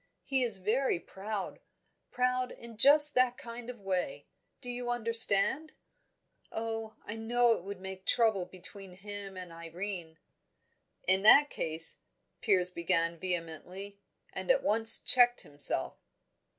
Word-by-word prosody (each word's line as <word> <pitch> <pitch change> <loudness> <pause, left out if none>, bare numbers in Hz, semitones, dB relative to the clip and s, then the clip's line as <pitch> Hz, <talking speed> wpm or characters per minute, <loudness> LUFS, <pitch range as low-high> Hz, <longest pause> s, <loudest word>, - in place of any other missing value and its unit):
He 265 -1 0
is 230 -5 0
very 215 +2 -1
proud 200 +2 -7 0.5
proud 250 0 -1
in 235 -1 -11
just 290 +6 +6
that 255 -1 +1
kind 235 0 -10
of 245 -2 -9
way 195 - -4 0.3
do 250 - -11
you 245 0 -5
understand? 230 +4 +3 0.8
Oh, 225 -1 -6
I 210 - -7
know 235 +2 +1
it 225 - -1
would 200 0 -8
make 190 0 -10
trouble 220 -6 +1
between 190 +1 -12
him 200 0 -9
and 180 -2 -9
Irene." 170 0 -8 0.9
"In 190 +1 +2
that 285 +8 +7
case," 160 0 0 0.4
Piers 185 -4 0
began 170 -1 -1
vehemently, 180 +3 -6 0.3
and - - -7
at - - +2
once 225 +1 +6
checked 245 -1 +2
himself. 145 -1 0
210 Hz, 130 wpm, -30 LUFS, 185-240 Hz, 0.9 s, that